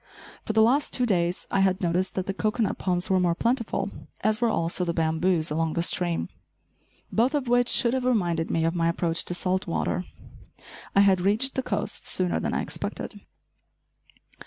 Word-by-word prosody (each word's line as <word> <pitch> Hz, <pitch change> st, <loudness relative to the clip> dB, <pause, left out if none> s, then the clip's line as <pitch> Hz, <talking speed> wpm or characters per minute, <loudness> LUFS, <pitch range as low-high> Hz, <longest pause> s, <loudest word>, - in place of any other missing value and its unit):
For 220 Hz, -, -2 dB
the 220 Hz, 0 st, +5 dB
last 270 Hz, +6 st, +2 dB
two 250 Hz, -, +2 dB
days 175 Hz, -5 st, 0 dB
I 195 Hz, -, +1 dB
had 190 Hz, -1 st, +2 dB
noticed 180 Hz, 0 st, -1 dB
that 185 Hz, -, -2 dB
the 195 Hz, -, -3 dB
cocoanut 215 Hz, +2 st, -1 dB
palms 180 Hz, 0 st, -1 dB
were 190 Hz, -, +4 dB
more 175 Hz, -2 st, +2 dB
plentiful, 230 Hz, -3 st, -1 dB, 0.3 s
as 215 Hz, 0 st, +1 dB
were 235 Hz, -, +3 dB
also 170 Hz, -2 st, 0 dB
the 170 Hz, -1 st, -2 dB
bamboos 160 Hz, 0 st, +1 dB
along 160 Hz, +1 st, 0 dB
the 170 Hz, -, 0 dB
stream, 175 Hz, -1 st, +1 dB, 0.8 s
both 245 Hz, +6 st, +2 dB
of 275 Hz, -4 st, -1 dB
which 245 Hz, 0 st, +3 dB
should 240 Hz, -2 st, +4 dB
have 260 Hz, -1 st, -1 dB
reminded 175 Hz, -9 st, +1 dB
me 165 Hz, 0 st, 0 dB
of 165 Hz, -, +1 dB
my 170 Hz, -1 st, +1 dB
approach 170 Hz, -1 st, 0 dB
to 175 Hz, -, -3 dB
salt 185 Hz, +1 st, -1 dB
water. 180 Hz, +1 st, -1 dB, 0.9 s
I 200 Hz, -, +6 dB
had 190 Hz, -2 st, +4 dB
reached 215 Hz, +8 st, +2 dB
the 265 Hz, -, -1 dB
coast -, -, -4 dB
sooner 180 Hz, -1 st, -1 dB
than -, -, -2 dB
I -, -, 0 dB
expected. -, -, -5 dB
185 Hz, 185 wpm, -26 LUFS, 170-220 Hz, 0.9 s, I